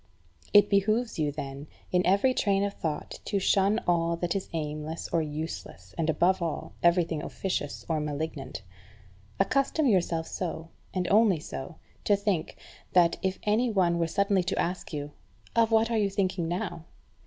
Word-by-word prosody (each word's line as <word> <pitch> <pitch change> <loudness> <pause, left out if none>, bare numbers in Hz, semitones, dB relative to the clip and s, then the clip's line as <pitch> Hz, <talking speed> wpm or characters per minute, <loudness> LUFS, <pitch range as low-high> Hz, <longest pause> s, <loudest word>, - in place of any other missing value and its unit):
It 205 - +7
behoves 215 +2 +1
you, 150 -2 +1
then, 140 0 -6 0.2
in 180 0 +3
every 200 +8 +4
train 200 -4 +2
of 200 0 -1
thought 155 -5 -4
to 205 - 0
shun 200 +2 +3
all 170 -1 +2
that 170 +1 -1
is 195 - -3
aimless 155 0 -4
or 165 - +1
useless, 155 +1 -6
and, 165 -1 -1
above 175 +4 +2
all, 165 -3 -3
everything 170 -2 +3
officious 160 -6 -3
or 160 -2 0
malignant. 145 -4 -4 0.8
Accustom 275 +9 +2
yourself 175 -7 +2
so, 165 -2 -4 0.2
and 180 -1 -1
only 205 -5 +5
so, 150 +2 -7 0.3
to 205 - +5
think, 200 -5 -1 0.4
that, 170 -2 +5
if 190 0 -1
any 220 +4 +2
one 175 -5 +2
were 165 - +1
suddenly 200 +3 +2
to 190 - -1
ask 180 +2 -2
you, 145 -2 -4 0.4
"Of 230 -1 +4
what 225 +1 +3
are 230 - +2
you 205 -1 +2
thinking 190 -3 -1
now?" 170 -1 -3
175 Hz, 165 wpm, -28 LUFS, 160-200 Hz, 0.8 s, It